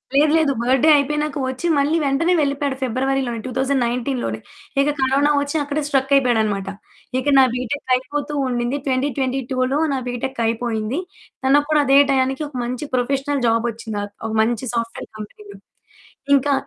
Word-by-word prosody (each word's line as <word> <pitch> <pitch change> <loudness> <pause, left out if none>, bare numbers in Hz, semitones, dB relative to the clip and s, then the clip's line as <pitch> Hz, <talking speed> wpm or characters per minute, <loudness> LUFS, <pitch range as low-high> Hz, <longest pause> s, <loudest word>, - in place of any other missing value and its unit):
లేదు, 295 +2 +5
లేదు 310 -3 +2
బర్త్‌డే 260 +5 +3
అయిపోయినాక 300 +1 -1
వచ్చి, 260 +6 -3
మళ్ళీ 290 +4 +2
వెంటనే 290 +6 +2
వెళ్ళిపోయాడు 280 -1 0
ఫిబ్రవరిలోనే. 260 -1 -1
2019లో 255 -1 -1
లోనే - - -4 0.4
ఇక 285 - +2
కరోనా 275 +3 +3
వచ్చి 285 +2 -3
అక్కడే 290 +1 -2
స్ట్రక్ 270 -2 0
అయిపోయాడన్నమాట. 220 -7 +1 0.5
ఇక 260 - -5
నా - - +8
బీటెక్ 255 +2 -4
అయిపోతూ 290 +3 -4
ఉండింది. 245 +2 -1
2022లో 260 -1 -1 0.2
నా - - 0
బీటెక్ 245 +1 -4
అయిపోయింది. 225 +3 -1 0.5
తనకు 290 +2 +4
కూడా 305 -1 +4
అదే 275 0 +5
టైయానికి 265 +2 +1
ఒక 285 - -14
మంచి 250 +4 -4
ప్రొఫెషనల్ 275 +2 -1
జాబొచ్చింది. 230 -1 -1
క్ - - -40
ఒక - - -4
మంచి 235 +2 0
సాఫ్ట్‌వేర్ 230 -1 -4
కంపెనీలో. 405 - -10 0.8
ఇంకా 280 +1 +2
265 Hz, 145 wpm, -20 LUFS, 245-285 Hz, 0.8 s, నా